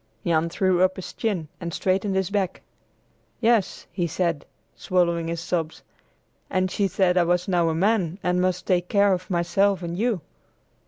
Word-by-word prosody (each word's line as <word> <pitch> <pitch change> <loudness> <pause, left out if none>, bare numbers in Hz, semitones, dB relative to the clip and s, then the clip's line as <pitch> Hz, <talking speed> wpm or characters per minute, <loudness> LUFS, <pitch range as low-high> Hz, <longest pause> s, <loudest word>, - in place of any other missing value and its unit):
Jan 165 -1 +2
threw 185 +1 +1
up 185 0 +3
his 190 - -7
chin, 195 -9 -2
and 170 -1 -5
straightened 190 +3 0
his 190 0 0
back. 195 -3 -1 0.8
"Yes," 230 -4 +1
he 175 -1 -1
said, 170 -2 -1 0.3
swallowing 170 -2 0
his 165 0 -3
sobs, 165 -2 -3 0.7
"and 185 0 0
she 200 - +1
said 185 -1 +2
I - - +4
was 175 +1 +1
now 175 -3 +2
a 160 - -1
man 190 -2 +1
and 180 0 +1
must 180 0 0
take 180 -1 +1
care 200 -1 +4
of 185 0 -4
myself 190 +2 +1
and 170 0 -4
you." 220 -2 0
180 Hz, 170 wpm, -24 LUFS, 170-190 Hz, 0.8 s, I